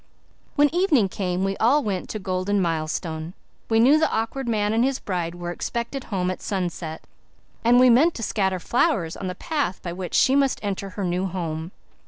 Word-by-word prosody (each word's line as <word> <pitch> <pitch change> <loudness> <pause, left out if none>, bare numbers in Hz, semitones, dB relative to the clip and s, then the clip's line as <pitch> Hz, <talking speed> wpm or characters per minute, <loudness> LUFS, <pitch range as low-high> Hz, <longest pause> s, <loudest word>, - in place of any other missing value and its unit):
When 295 +1 +4
evening 325 - +3
came 185 -1 -2
we 195 0 0
all 275 +6 +3
went 195 -4 -3
to - - -3
Golden 190 +1 -1
Milestone. 160 0 -2 0.3
We 225 0 +3
knew 275 +7 +6
the 315 - +2
Awkward 235 +4 -2
Man 210 -2 +1
and 230 +2 +3
his 270 0 +1
bride 175 -6 -3
were 175 0 -5
expected 235 +8 -4
home 185 -3 -1
at 185 - -7
sunset, 175 -4 -4 0.6
and 240 +2 +5
we 255 - +7
meant 305 +8 +4
to 230 - -5
scatter 190 -3 0
flowers 195 - +1
on 190 - -5
the 180 - -4
path 285 - -2
by 170 - -4
which 180 0 -5
she 265 - +4
must 275 -2 +2
enter 200 -1 -3
her 195 +2 -5
new 180 +1 0
home. 165 -3 -4
195 Hz, 195 wpm, -24 LUFS, 180-245 Hz, 0.6 s, we